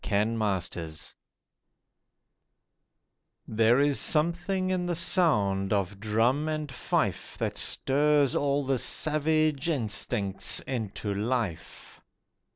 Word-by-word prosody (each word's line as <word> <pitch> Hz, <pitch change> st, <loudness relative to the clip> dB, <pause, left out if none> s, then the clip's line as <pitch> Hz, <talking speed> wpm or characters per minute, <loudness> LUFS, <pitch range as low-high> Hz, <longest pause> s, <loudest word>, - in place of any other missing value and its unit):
WAR 105 Hz, 0 st, +2 dB
MOTHERS 95 Hz, -8 st, -3 dB, 2.3 s
There 115 Hz, +3 st, +3 dB
is 145 Hz, -1 st, +2 dB
something 175 Hz, +4 st, +1 dB
in 180 Hz, -1 st, -1 dB
the 175 Hz, -, -1 dB
sound 105 Hz, -, +2 dB
of 100 Hz, -1 st, -1 dB
drum 115 Hz, +8 st, +1 dB
and 155 Hz, -2 st, -3 dB
fife 125 Hz, -, -2 dB
That -, -, -2 dB
stirs 145 Hz, 0 st, +2 dB
all 140 Hz, 0 st, 0 dB
the 135 Hz, -1 st, 0 dB
savage 155 Hz, +1 st, +1 dB
instincts 105 Hz, -, -1 dB
into 110 Hz, -4 st, -4 dB
life. 105 Hz, -4 st, -4 dB
130 Hz, 95 wpm, -27 LUFS, 105-155 Hz, 2.3 s, There